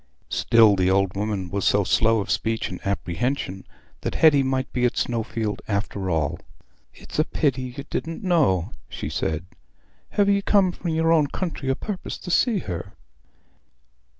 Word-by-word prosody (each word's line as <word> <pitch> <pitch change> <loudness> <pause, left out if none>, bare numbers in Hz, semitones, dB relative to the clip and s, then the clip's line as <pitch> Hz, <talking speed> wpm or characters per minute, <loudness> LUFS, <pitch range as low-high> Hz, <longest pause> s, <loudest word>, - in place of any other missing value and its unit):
Still 110 -3 +5
the 95 -1 +2
old 95 0 +2
woman 100 -3 -2
was 100 -1 -1
so 100 0 +3
slow 115 +3 +3
of - - -4
speech 115 0 -1
and 90 - -6
apprehension, 95 +1 -2 0.3
that - - -3
Hetty 150 -3 +6
might 130 0 -1
be 125 - 0
at 125 0 +1
Snowfield 115 -2 -2
after 100 -2 -2
all. 80 -4 0 0.5
"It's - - -8
a - - +5
pity 130 -6 -1
ye 140 - -6
didna 165 0 -3
know," 115 - +2 0.2
she - - -5
said. 80 +1 -2 0.6
"Have 205 -1 +2
ye 200 0 +3
come 195 -2 +3
from 175 0 -5
your 160 0 +2
own 155 -3 +4
country 155 -4 -4
o' 135 - +2
purpose 200 +3 -5
to 180 - -7
see 235 +3 +3
her?" 90 +2 -6
115 Hz, 165 wpm, -24 LUFS, 95-155 Hz, 0.6 s, Hetty